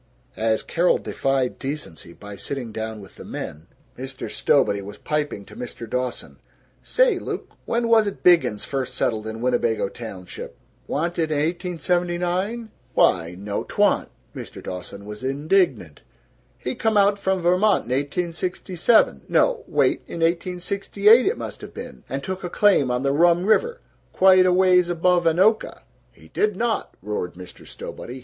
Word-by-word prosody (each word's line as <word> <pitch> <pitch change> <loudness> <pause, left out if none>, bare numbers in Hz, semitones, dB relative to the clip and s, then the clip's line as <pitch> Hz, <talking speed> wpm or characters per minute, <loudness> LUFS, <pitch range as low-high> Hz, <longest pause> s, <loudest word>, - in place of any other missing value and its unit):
As 110 0 0
Carol 175 +1 +2
defied 135 -2 -1
decency 135 - -6
by 105 +3 -10
sitting 125 +1 -5
down 110 0 -5
with 95 - -15
the - - -9
men, 75 +2 -7 0.3
Mr. 130 +1 -7
Stowbody 100 0 +2
was 100 +1 -9
piping 150 -9 -3
to - - -14
Mr. 120 -1 -7
Dawson, 125 +1 -4 0.4
"Say, - - +2
Luke, - - -6
when 235 0 0
was't 220 -3 +2
Biggins 170 - +4
first 135 -2 -3
settled 110 -4 -1
in 110 +1 -6
Winnebago 120 -4 +1
Township? 100 -6 -9 0.3
Wa'n't 170 +4 -2
it 160 -1 +1
in 155 - 0
1879?" 180 +6 -1 0.2
"Why 85 -1 +3
no 100 +1 -3
'twa'n't!" - - +1 0.3
Mr. - - -8
Dawson 90 +2 -7
was 105 +3 -8
indignant. 135 - 0 0.6
"He 125 - -4
come 220 -1 0
out 200 0 +4
from 190 -1 0
Vermont 185 +5 +3
in - - -7
1867 175 - +1
no, - - +2
wait, - - +2
in 165 - -6
1868, 195 +6 +3
it 430 - +1
must - - -7
have - - -10
been - - -9
and 140 +1 -3
took 190 +2 -5
a 180 - -3
claim 195 -9 +3
on 125 +1 -1
the 140 - +2
Rum 170 +3 +4
River, 470 - +2 0.3
quite 185 -1 +6
a - - +4
ways 180 -1 +4
above 175 0 +2
Anoka." 190 +7 +2 0.3
"He 80 -9 -19
did 210 - 0
not!" 230 +2 -2
roared 105 -4 -3
Mr. 90 0 -12
Stowbody. 125 +2 -8
165 Hz, 155 wpm, -23 LUFS, 115-185 Hz, 0.6 s, quite